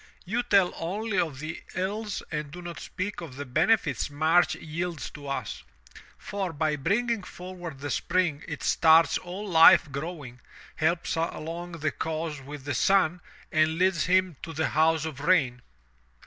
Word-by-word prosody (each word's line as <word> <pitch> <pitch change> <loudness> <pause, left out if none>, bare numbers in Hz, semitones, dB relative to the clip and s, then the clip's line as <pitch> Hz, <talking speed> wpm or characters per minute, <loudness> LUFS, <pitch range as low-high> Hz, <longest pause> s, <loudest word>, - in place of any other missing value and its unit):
"You 225 +7 0
tell 200 -7 +3
only 195 +4 -2
of 160 -6 -1
the 155 +4 -6
ills 205 +3 -3
and 150 -2 -3
do 175 +4 -9
not 175 -1 -7
speak 195 0 -5
of 155 -7 -8
the 145 +1 -6
benefits 155 - +1
March 160 +4 +3
yields 165 +1 -5
to 145 -1 -10
us, 140 - -4 0.6
for 195 -3 -4
by 155 0 0
bringing 210 - 0
forward 175 -6 -9
the 145 -1 -3
Spring 175 +2 0
it - - -6
starts 160 0 +5
all 185 +4 -7
life 160 -4 +7
growing, 140 -4 -6 0.4
helps 165 +3 0
along 165 +1 -4
the 155 -2 -1
cause 160 -2 -4
with 145 +1 -9
the 145 +1 -3
sun, 180 +4 +3 0.3
and 155 -1 +2
leads 185 -1 +2
him 185 -3 +2
to 165 - -7
the 160 0 0
house 160 +1 +2
of 155 -4 -6
rain." 140 -6 +2
165 Hz, 160 wpm, -27 LUFS, 150-185 Hz, 0.6 s, life